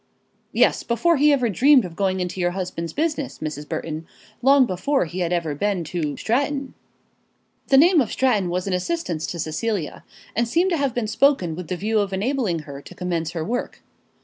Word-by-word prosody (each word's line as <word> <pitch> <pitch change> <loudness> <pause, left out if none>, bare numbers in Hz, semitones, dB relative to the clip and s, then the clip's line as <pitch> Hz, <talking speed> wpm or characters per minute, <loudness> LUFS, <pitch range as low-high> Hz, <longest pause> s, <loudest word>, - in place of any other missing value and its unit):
"Yes; - - +3
before 325 +8 +2
he 295 +2 +5
ever 260 -4 +2
dreamed 255 - +5
of 170 -2 -8
going 190 -1 0
into 180 +1 -4
your 175 - +2
husband's 180 -3 -4
business, 300 - -2
Mrs. 150 -1 -6
Burton; 160 0 -4 0.3
long 270 +1 +6
before 235 +6 0
he 175 +3 -6
had 175 -1 -1
ever 170 -4 0
been 190 +3 -1
to 155 -2 -3
Stratton." 275 +3 -1 0.9
The 270 - +5
name 335 +2 +6
of 230 - -2
Stratton 215 -9 +1
was 180 +1 -2
an 195 - -2
assistance 180 - -2
to 175 - -5
Cecilia, 170 +2 -3 0.3
and 235 +1 +1
seemed 345 +10 +2
to 340 - +2
have 275 -4 -1
been 240 -2 0
spoken 215 - +2
with 180 -1 -7
the 180 - -3
view 215 +4 0
of 200 -1 -1
enabling 205 - -1
her 140 -1 -9
to - - -13
commence 170 -3 -2
her 160 -2 -3
work. 245 +3 -4
195 Hz, 195 wpm, -23 LUFS, 170-270 Hz, 0.9 s, long